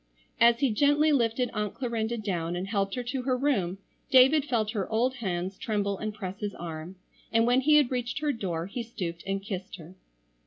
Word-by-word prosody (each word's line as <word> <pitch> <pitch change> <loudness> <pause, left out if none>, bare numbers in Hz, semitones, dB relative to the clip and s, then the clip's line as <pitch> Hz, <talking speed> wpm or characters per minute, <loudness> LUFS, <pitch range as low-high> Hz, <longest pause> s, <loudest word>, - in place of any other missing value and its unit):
As 235 +2 +5
he 270 -4 +3
gently 290 +6 +3
lifted 245 -2 +1
Aunt 210 -2 -2
Clarinda 235 -2 -2
down 175 -5 -2
and 180 +2 -3
helped 195 -1 -1
her 250 - -3
to 250 +2 -3
her 255 0 0
room 200 -10 0 0.3
David 270 +3 +6
felt 220 -6 0
her 205 -5 -3
old 250 +4 +1
hands 190 -3 -3
tremble 200 -3 -1
and 215 0 -3
press 195 -2 -7
his 205 -1 -4
arm, 165 +1 -7 0.4
and 230 0 +3
when 245 +2 +3
he 300 +3 +5
had 290 -4 +4
reached 245 -1 -2
her 295 +1 0
door 180 -9 -3
he 200 +6 -5
stooped 180 -7 -5
and 195 0 -2
kissed 190 -2 -5
her. 165 +2 -12
220 Hz, 200 wpm, -28 LUFS, 195-250 Hz, 0.4 s, David